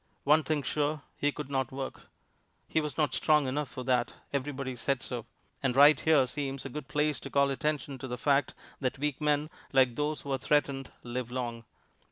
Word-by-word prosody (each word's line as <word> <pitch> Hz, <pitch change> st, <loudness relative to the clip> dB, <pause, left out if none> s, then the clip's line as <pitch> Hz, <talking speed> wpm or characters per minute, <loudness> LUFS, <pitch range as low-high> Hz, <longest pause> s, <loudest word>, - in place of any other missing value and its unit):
One 150 Hz, +2 st, +5 dB
thing 155 Hz, -2 st, -1 dB
sure, 150 Hz, 0 st, -1 dB
he 145 Hz, -, +1 dB
could 145 Hz, -1 st, -7 dB
not 135 Hz, -2 st, 0 dB
work: 135 Hz, 0 st, -6 dB, 0.6 s
he 160 Hz, -, +1 dB
was 150 Hz, -1 st, -4 dB
not 150 Hz, -5 st, +2 dB
strong 150 Hz, +2 st, +3 dB
enough 135 Hz, +1 st, -1 dB
for 130 Hz, -, -6 dB
that 125 Hz, -2 st, +1 dB, 0.2 s
everybody 135 Hz, -2 st, -2 dB
said 135 Hz, +2 st, -1 dB
so. 120 Hz, -3 st, -5 dB, 0.3 s
And 130 Hz, -3 st, +1 dB
right 145 Hz, +2 st, +8 dB
here 155 Hz, -5 st, +4 dB
seems 135 Hz, 0 st, -4 dB
a -, -, -4 dB
good 145 Hz, +1 st, -6 dB
place 150 Hz, 0 st, 0 dB
to -, -, -8 dB
call 140 Hz, 0 st, +3 dB
attention 145 Hz, -2 st, -2 dB
to 130 Hz, -, -5 dB
the 125 Hz, -1 st, -4 dB
fact 140 Hz, +3 st, +2 dB, 0.2 s
that 130 Hz, -2 st, -1 dB
weak 150 Hz, +1 st, -2 dB
men, 150 Hz, +1 st, +1 dB, 0.2 s
like 130 Hz, -3 st, +4 dB
those 150 Hz, +1 st, -1 dB
who 140 Hz, -, -6 dB
are 135 Hz, -, 0 dB
threatened, 140 Hz, -1 st, +1 dB
live 120 Hz, 0 st, -4 dB
long. 120 Hz, -2 st, -4 dB
140 Hz, 200 wpm, -30 LUFS, 130-150 Hz, 0.6 s, right